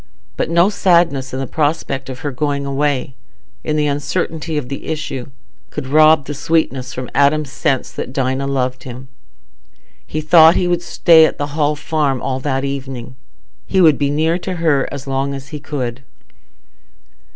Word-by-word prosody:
But - - -2
no 170 +4 +4
sadness 170 -9 +2
in 130 - -4
the 135 - -2
prospect 145 -2 -2
of 130 -1 -7
her 145 - -3
going 140 +1 -2
away—in 130 - -4
the 150 -1 +1
uncertainty 155 +2 -2
of 140 -4 -3
the 140 +1 -7
issue—could 140 -1 -7
rob 155 +1 +5
the 145 - -5
sweetness 140 -4 -1
from 125 0 -5
Adam's 140 0 +2
sense 135 -1 -1
that - - -6
Dinah 135 0 -1
loved 130 -2 -1
him. 130 +1 -9 0.9
He 155 - -4
thought 160 +1 +6
he 180 - +1
would 175 -1 +1
stay 165 -1 +5
at - - -6
the 145 0 -4
Hall 150 -1 +1
Farm 150 -3 -1
all 130 0 -2
that 135 0 -1
evening. 135 -2 -5 0.5
He 190 - +1
would 160 -5 +5
be 140 -1 +1
near 160 +4 +1
her 165 -7 0
as 140 - -7
long 135 +1 -2
as 135 0 -9
he 150 - -6
could. 135 -4 -4
140 Hz, 160 wpm, -18 LUFS, 130-155 Hz, 0.9 s, thought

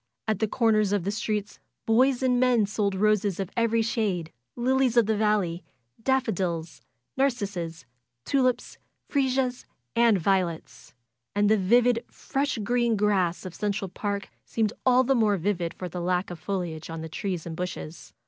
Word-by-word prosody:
At 215 -3 0
the 220 - +1
corners 215 -3 +2
of 200 -4 +1
the 200 - -1
streets 210 -1 -3 0.3
boys 255 +3 +3
and 250 -1 +3
men 245 -4 +4
sold 200 -1 -1
roses 205 -1 +2
of 190 -2 -3
every 230 -1 +2
shade, 200 -8 -1 0.2
lilies 255 0 +2
of 235 - +6
the 220 +1 +1
valley, 205 -5 +1 0.4
daffodils, 185 - -1 0.4
narcissus, 200 - -1 0.4
tulips, 255 -3 0 0.3
fresias, 260 -2 0 0.3
and 230 -3 +5
violets. 180 -5 -1 0.4
And 205 +1 +3
the 220 - +5
vivid, 235 +5 +3
fresh 275 -1 -2
green 235 +2 +1
grass 195 -4 +1
of 185 - -6
Central 200 +1 -2
Park 200 +1 -3
seemed 220 -2 -1
all 255 0 +6
the 270 +2 +2
more 215 -5 +3
vivid 175 -2 -1
for 185 - -6
the 175 +1 -5
lack 180 +1 0
of 175 - -7
foliage 170 -3 -4
on 165 0 -5
the 160 - -5
trees 175 +1 -4
and 165 -1 -5
bushes. 170 -2 -6
210 Hz, 160 wpm, -26 LUFS, 180-235 Hz, 0.4 s, of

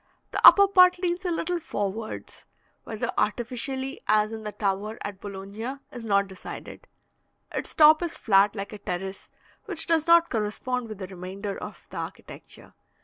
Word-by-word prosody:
The - - -2
upper 400 0 +10
part 365 -2 +6
leans 355 0 -2
a - - +1
little 345 +1 -1
forwards 215 - -5 0.4
(whether 220 -1 -3
artificially, 260 +4 -2
as 215 +1 +3
in 220 - -6
the 210 - -4
tower 205 +1 -2
at 200 -2 -6
Bologna, 205 +5 -6 0.2
is 240 -2 -8
not 200 -2 +2
decided); 190 -1 -10 0.6
its - - -5
top 310 +1 +7
is 345 -2 -3
flat, 200 0 +3
like 200 +1 -5
a 210 - -8
terrace, 190 +2 -5 0.4
which 375 -7 -2
does 325 -1 +1
not 335 0 +5
correspond 230 +2 -2
with 215 - -7
the 190 - -6
remainder 190 +2 -6
of - - -9
the - - -7
architecture. - - -9
220 Hz, 160 wpm, -26 LUFS, 200-310 Hz, 0.6 s, upper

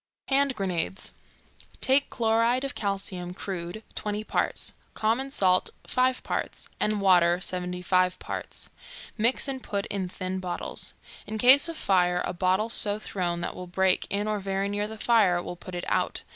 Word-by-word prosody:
HAND 275 -1 +3
GRENADES. 190 -1 -2 0.7
Take 270 +2 +3
chloride 230 +2 +2
of 275 0 -3
calcium, 195 -4 -3
crude, 185 +2 -5
20 210 0 -3
parts; - - -1 0.2
common 230 +5 0
salt, 185 -9 +2 0.2
5 255 0 +1
parts; - - -3
and 210 -1 +1
water, 175 -2 +5
75 180 0 0
parts. - - -7 0.5
Mix 235 +6 +2
and 265 -1 -3
put 200 -3 -3
in 190 -3 -2
thin 185 +1 -4
bottles. 180 -1 -3 0.3
In 220 - -3
case 265 +8 +7
of 330 - -5
fire, 180 -5 +2
a - - -3
bottle 185 +5 +1
so 205 -3 +5
thrown 175 -5 -3
that - - -2
it - - -15
will 180 - -7
break 185 +1 +2
in 205 +1 -1
or 215 -1 0
very 195 0 -1
near 205 +1 -1
the 220 +1 -8
fire 215 -6 +3
will 175 - -6
put 180 +1 -9
it 175 - -4
out. - - 0
200 Hz, 165 wpm, -27 LUFS, 180-225 Hz, 0.7 s, case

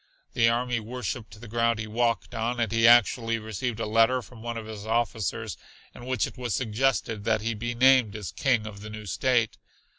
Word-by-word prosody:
The 115 -1 +4
army 120 0 0
worshipped 115 -1 -6
the 120 - -10
ground 115 +1 +1
he 110 - -4
walked 115 +1 -1
on, 120 +1 -2
and 115 -3 0
he 115 0 +4
actually 115 0 +5
received 110 +1 -4
a - - -1
letter 115 +4 +3
from 120 -2 -14
one 120 0 -4
of 110 - -6
his 110 -2 -8
officers 110 -2 -1 0.4
in 120 - -11
which 130 -6 +1
it - - -10
was 120 -4 -1
suggested 115 -2 0
that 110 -2 +2
he 115 +2 -1
be 120 +2 -4
named 130 -4 +5
as 105 -3 -5
King 125 -6 +1
of 100 -2 -8
the 105 - -8
new 105 0 -8
state. 120 +3 +1
115 Hz, 205 wpm, -27 LUFS, 110-120 Hz, 0.4 s, actually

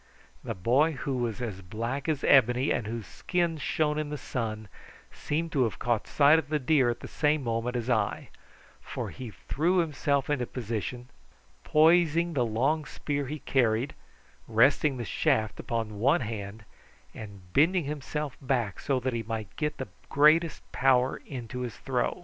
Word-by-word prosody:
The - - -4
boy, 130 - +2
who 135 -1 -3
was 120 -1 -2
as 100 -5 -5
black 115 - -4
as 150 -3 -1
ebony 125 0 +4
and 105 - -1
whose 115 -1 -4
skin 170 - -1
shone 150 +2 0
in 155 -1 -3
the 150 - -4
sun, 110 -4 -4 0.4
seemed 165 +3 -3
to 140 - +1
have 115 - -3
caught 120 -3 -1
sight 150 +2 +5
of 160 - -7
the 155 - +1
deer 135 -2 +3
at 120 - -3
the - - -7
same 150 -1 +1
moment 115 +1 -2
as 120 -1 -2
I, 110 -5 0 0.5
for - - -5
he 125 -3 -7
threw 165 - -1
himself 145 -4 +1
into 130 -5 -1
position, 120 +1 -5 0.5
poising 165 +1 +4
the 130 -5 +2
long 140 +8 +1
spear 145 0 -3
he 150 +3 -4
carried, 120 0 +1 0.5
resting 130 +5 +3
the 120 - -4
shaft 110 0 0
upon 110 -3 -3
one 140 +8 +3
hand 105 -2 -5 0.5
and 100 -4 -11
bending 170 +5 +4
himself 150 -1 -4
back 125 -7 -1
so 135 -2 0
that 130 0 -2
he 115 - -1
might 110 -3 -5
get 150 -1 -2
the - - -5 0.2
greatest 155 +3 +4
power 130 0 +2
into 125 -2 -6
his 120 -5 -5
throw. 125 +3 -1
130 Hz, 165 wpm, -28 LUFS, 115-150 Hz, 0.5 s, sight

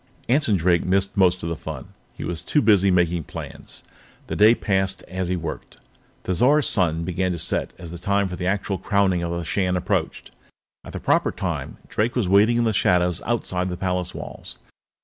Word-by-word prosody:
Anson 125 -4 +3
Drake 85 -1 +2
missed 95 +2 +1
most 90 -3 +3
of 85 - -2
the 85 - -2
fun; - - -8 0.3
he - - -7
was 85 -1 -2
too 150 - +1
busy 100 -7 +4
making 85 -3 +1
plans. - - -8 0.4
The - - -4
day 110 +3 +6
passed 95 -4 -1
as 95 -1 -4
he 90 - 0
worked. 80 -3 -6 0.5
Thizar's 130 - +3
sun 85 -5 +1
began 90 +1 -1
to - - -4
set 80 - 0
as 85 -1 -9
the 90 +4 -5
hour 100 0 +3
for 90 - -5
the 90 0 -3
actual 95 0 -1
Crowning 100 -4 +1
of 85 - -2
the 85 0 -3
Shan 90 +1 0
approached. 90 -1 -2 0.5
At - - -11
the - - -4
proper - - +2
time, - - -4
Drake 115 +3 -1
was 120 -7 +1
waiting 105 +5 +4
in 120 - +2
the 110 -1 +1
shadows 90 -2 +2
outside 95 -6 -1
the 90 - -4
palace 90 -1 -2
walls. - - -7
90 Hz, 195 wpm, -23 LUFS, 90-100 Hz, 0.5 s, day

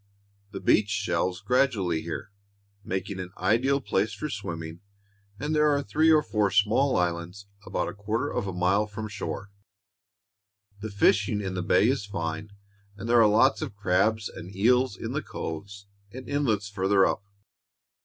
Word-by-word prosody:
The - - -6
beach 105 -1 +3
shelves 90 -2 -1
gradually 100 -8 +1
here, 85 +4 -6 0.5
making 95 0 -4
an 90 -1 -5
ideal 135 +5 +2
place 110 -5 0
for 150 - -4
swimming, 85 -5 -6 0.6
and 150 +3 -2
there 150 0 +4
are 145 -1 +1
three 155 +3 +3
or 155 -1 +5
four 105 -4 +1
small 110 +8 +3
islands 90 +2 -2 0.2
about - - -1
a - - -5
quarter 105 +3 -2
of 100 - -2
a - - -2
mile 95 +4 +1
from 110 +1 -6
shore. 100 -1 -6 1.3
The 110 +2 -5
fishing 100 +1 +2
in 95 -2 -3
the 90 - -2
bay 90 +4 +3
is 125 -5 0
fine, 85 0 -4 0.5
and 100 +3 -6
there 120 0 +5
are 110 - +6
lots 105 +1 +4
of 100 - -5
crabs 105 +2 +1
and 90 +3 -10
eels 125 +2 +3
in - - -5
the - - -2
coves 100 +5 -7 0.3
and 130 +1 -9
inlets 120 -8 0
farther 95 -1 +2
up. 105 - -1
105 Hz, 165 wpm, -27 LUFS, 95-115 Hz, 1.3 s, are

